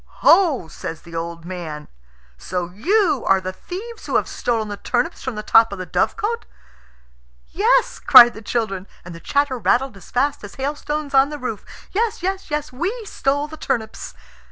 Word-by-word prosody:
"Ho," 325 Hz, -, +5 dB
says 160 Hz, 0 st, -7 dB
the 170 Hz, -, -13 dB
old 165 Hz, 0 st, -5 dB
man, 165 Hz, -5 st, -6 dB, 0.5 s
"so 175 Hz, -, -4 dB
you 330 Hz, -, +1 dB
are 195 Hz, -, +5 dB
the 185 Hz, 0 st, -5 dB
thieves 425 Hz, -, -8 dB
who -, -, -2 dB
have -, -, +2 dB
stolen 225 Hz, -3 st, -1 dB
the 205 Hz, -, -4 dB
turnips 250 Hz, -, -2 dB
from 260 Hz, -4 st, -4 dB
the 210 Hz, -, -5 dB
top 225 Hz, +1 st, +5 dB
of 200 Hz, -, -5 dB
the 185 Hz, -, -5 dB
dovecot?" 445 Hz, -, -1 dB, 1.0 s
"Yes," -, -, +2 dB
cried 240 Hz, 0 st, +9 dB
the 220 Hz, -, -10 dB
children, 205 Hz, -4 st, -2 dB, 0.2 s
and 180 Hz, -, -8 dB
the 165 Hz, -, -9 dB
chatter 280 Hz, +4 st, 0 dB
rattled 240 Hz, +5 st, +1 dB
as 195 Hz, -, -14 dB
fast 280 Hz, +2 st, 0 dB
as 205 Hz, -, -9 dB
hailstones 290 Hz, +1 st, -3 dB
on 270 Hz, +1 st, +5 dB
the 300 Hz, -, -5 dB
roof. 250 Hz, -6 st, -5 dB, 0.3 s
"Yes! 430 Hz, -2 st, -1 dB
yes! 385 Hz, +1 st, -2 dB
yes! 300 Hz, -1 st, -3 dB
We 405 Hz, -, -3 dB
stole 285 Hz, -5 st, -1 dB
the 315 Hz, +1 st, -10 dB
turnips." 220 Hz, -6 st, -3 dB
250 Hz, 180 wpm, -21 LUFS, 190-300 Hz, 1.0 s, cried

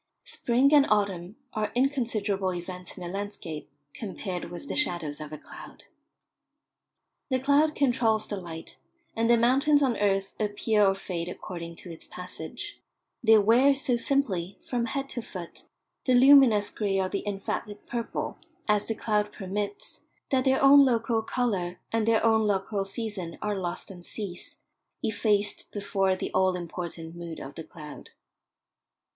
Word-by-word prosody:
Spring 255 Hz, +4 st, +2 dB
and 285 Hz, -2 st, +7 dB
autumn 200 Hz, -2 st, 0 dB, 0.2 s
are 215 Hz, -1 st, -1 dB
inconsiderable 225 Hz, -8 st, +1 dB
events 180 Hz, +1 st, -7 dB
in 180 Hz, -, -7 dB
a -, -, -4 dB
landscape 195 Hz, -5 st, -5 dB, 0.2 s
compared 190 Hz, -3 st, -5 dB
with 175 Hz, +11 st, -5 dB
the -, -, -3 dB
shadows 165 Hz, -, 0 dB
of 155 Hz, -1 st, -7 dB
a 155 Hz, -, -6 dB
cloud. -, -, -12 dB, 1.5 s
The 260 Hz, -, +2 dB
cloud 285 Hz, +3 st, +3 dB
controls 235 Hz, -5 st, +2 dB
the 205 Hz, -, -3 dB
light, 165 Hz, -2 st, -9 dB, 0.4 s
and 230 Hz, +1 st, +1 dB
the 235 Hz, -, +6 dB
mountains 275 Hz, +5 st, +4 dB
on 250 Hz, -4 st, +1 dB
earth 195 Hz, -1 st, +1 dB
appear 210 Hz, 0 st, +2 dB
or 195 Hz, -1 st, +4 dB
fade 175 Hz, -3 st, -4 dB
according 170 Hz, -2 st, -7 dB
to 175 Hz, -, -10 dB
its 165 Hz, -, -10 dB
passage; 180 Hz, 0 st, -7 dB, 0.4 s
they 220 Hz, -1 st, +7 dB
wear 240 Hz, +7 st, +5 dB
so 260 Hz, -2 st, +1 dB
simply, 220 Hz, -8 st, 0 dB
from 240 Hz, -2 st, -1 dB
head 275 Hz, +4 st, -2 dB
to 240 Hz, -, -4 dB
foot, 180 Hz, -6 st, -9 dB, 0.4 s
the 255 Hz, -, +4 dB
luminous 255 Hz, -5 st, +7 dB
grey 200 Hz, -3 st, 0 dB
or 190 Hz, -, +1 dB
the 200 Hz, +1 st, -2 dB
emphatic 205 Hz, +1 st, -4 dB
purple, 235 Hz, -1 st, -4 dB, 0.3 s
as 210 Hz, -1 st, +2 dB
the 225 Hz, -, -1 dB
cloud 210 Hz, -1 st, 0 dB
permits, 205 Hz, +1 st, -4 dB, 0.3 s
that 260 Hz, -1 st, +2 dB
their 265 Hz, 0 st, +3 dB
own 280 Hz, +1 st, +9 dB
local 230 Hz, -3 st, +2 dB
colour 195 Hz, -7 st, -1 dB
and 225 Hz, -1 st, +1 dB
their 230 Hz, 0 st, +3 dB
own 220 Hz, -1 st, +4 dB
local 195 Hz, 0 st, 0 dB
season 195 Hz, -5 st, -5 dB
are 210 Hz, -1 st, -1 dB
lost 180 Hz, 0 st, -3 dB
and 175 Hz, -2 st, -11 dB
cease, 185 Hz, -2 st, -7 dB, 0.5 s
effaced 205 Hz, -1 st, 0 dB
before 195 Hz, -2 st, 0 dB
the -, -, -4 dB
all 185 Hz, 0 st, +3 dB
important 170 Hz, -1 st, -6 dB
mood 170 Hz, -2 st, -7 dB
of 135 Hz, -, -8 dB
the 160 Hz, -, -7 dB
cloud. 150 Hz, -2 st, -11 dB
205 Hz, 155 wpm, -28 LUFS, 180-235 Hz, 1.5 s, own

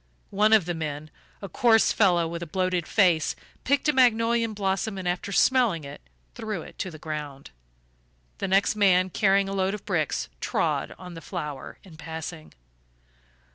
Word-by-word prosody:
One 210 Hz, +2 st, +3 dB
of 215 Hz, -6 st, +5 dB
the 175 Hz, -, -2 dB
men, 155 Hz, -2 st, -5 dB, 0.3 s
a -, -, -4 dB
coarse 225 Hz, +4 st, +3 dB
fellow 175 Hz, -5 st, +3 dB
with 170 Hz, +1 st, -5 dB
a 170 Hz, -, -5 dB
bloated 185 Hz, 0 st, -1 dB
face, 175 Hz, -7 st, +2 dB, 0.3 s
picked 280 Hz, +2 st, +1 dB
a 300 Hz, -, +3 dB
magnolia 235 Hz, -2 st, +3 dB
blossom 200 Hz, 0 st, -2 dB
and, 185 Hz, -1 st, -4 dB
after 180 Hz, +3 st, -2 dB
smelling 230 Hz, -, +3 dB
it, 140 Hz, -, -9 dB, 0.3 s
threw 215 Hz, -6 st, -5 dB
it -, -, -14 dB
to 185 Hz, -, -3 dB
the 160 Hz, -, -10 dB
ground; 150 Hz, -3 st, -7 dB, 0.9 s
the -, -, -2 dB
next 195 Hz, +3 st, +2 dB
man, 185 Hz, -3 st, +3 dB
carrying 195 Hz, 0 st, +2 dB
a 195 Hz, -, -4 dB
load 195 Hz, +1 st, 0 dB
of 210 Hz, -, -11 dB
bricks, -, -, -1 dB
trod -, -, -1 dB
on 180 Hz, -1 st, -10 dB
the 165 Hz, -, -9 dB
flower 150 Hz, -2 st, -6 dB
in 170 Hz, -5 st, -15 dB
passing. 160 Hz, 0 st, -7 dB
185 Hz, 170 wpm, -26 LUFS, 165-210 Hz, 0.9 s, of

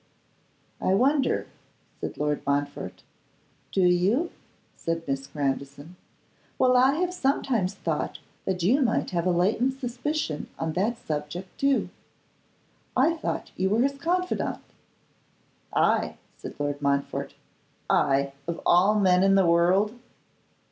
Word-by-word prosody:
'I 190 Hz, -, +2 dB
wonder!' 270 Hz, +5 st, +2 dB, 0.5 s
said -, -, -5 dB
Lord 150 Hz, 0 st, 0 dB
Montfort. 140 Hz, 0 st, -2 dB, 0.7 s
'Do 195 Hz, -, +1 dB
you?' 190 Hz, -, +3 dB, 0.4 s
said 165 Hz, -1 st, -3 dB
Miss 135 Hz, 0 st, -2 dB
Grandison. 140 Hz, +3 st, -4 dB, 0.6 s
'Well, 255 Hz, 0 st, +4 dB
I 260 Hz, +3 st, +5 dB
have 360 Hz, +2 st, 0 dB
sometimes 255 Hz, -, 0 dB
thought 160 Hz, -6 st, -2 dB, 0.3 s
that 185 Hz, -2 st, -1 dB
you 250 Hz, +11 st, +4 dB
might 230 Hz, -4 st, +1 dB
have 175 Hz, 0 st, 0 dB
a -, -, +3 dB
latent 220 Hz, +10 st, +1 dB
suspicion 250 Hz, -, -3 dB
of 160 Hz, -1 st, -2 dB
that 215 Hz, +8 st, 0 dB
subject, 155 Hz, +4 st, -5 dB
too. 275 Hz, -1 st, +2 dB, 1.1 s
I 305 Hz, +6 st, +4 dB
thought 320 Hz, -, -4 dB
you 190 Hz, +1 st, 0 dB
were 215 Hz, +4 st, +2 dB
his 275 Hz, +1 st, 0 dB
confidant.' 360 Hz, +4 st, -1 dB, 1.1 s
'I!' -, -, +1 dB, 0.2 s
said -, -, -9 dB
Lord 145 Hz, 0 st, -2 dB
Montfort; 140 Hz, 0 st, -1 dB, 0.5 s
'I, 140 Hz, 0 st, +2 dB
of 170 Hz, -1 st, -3 dB
all 195 Hz, +5 st, +5 dB
men 185 Hz, -2 st, +4 dB
in 195 Hz, 0 st, +5 dB
the 195 Hz, -1 st, +4 dB
world? 180 Hz, +5 st, +3 dB
185 Hz, 125 wpm, -26 LUFS, 155-255 Hz, 1.1 s, I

